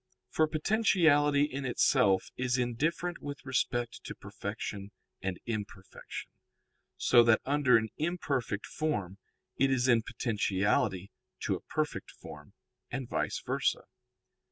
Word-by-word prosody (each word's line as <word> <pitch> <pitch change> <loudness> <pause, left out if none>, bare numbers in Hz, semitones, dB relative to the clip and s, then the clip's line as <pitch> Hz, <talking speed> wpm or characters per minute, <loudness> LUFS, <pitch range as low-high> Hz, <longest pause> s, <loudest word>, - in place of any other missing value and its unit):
For 155 - +3
potentiality 155 -5 +3
in 140 -1 -2
itself 125 -5 +3
is 125 0 0
indifferent 155 +8 -1
with 145 -1 -7
respect 120 -2 -1
to - - -6
perfection 100 -1 -6 0.3
and 95 -1 -3
imperfection, 105 -4 -6 0.7
so 120 -1 +6
that 115 -1 +5
under 140 -3 +4
an 110 0 -1
imperfect 140 - -1
form 105 - -3 0.4
it 135 +1 +4
is 130 -1 +2
in 120 -2 +5
potentiality 100 -3 0 0.3
to - - 0
a - - -3
perfect - - -3
form, 75 -1 -12 0.4
and 135 -3 -4
_vice - - -2
versa. - - 0
125 Hz, 120 wpm, -31 LUFS, 105-145 Hz, 0.7 s, so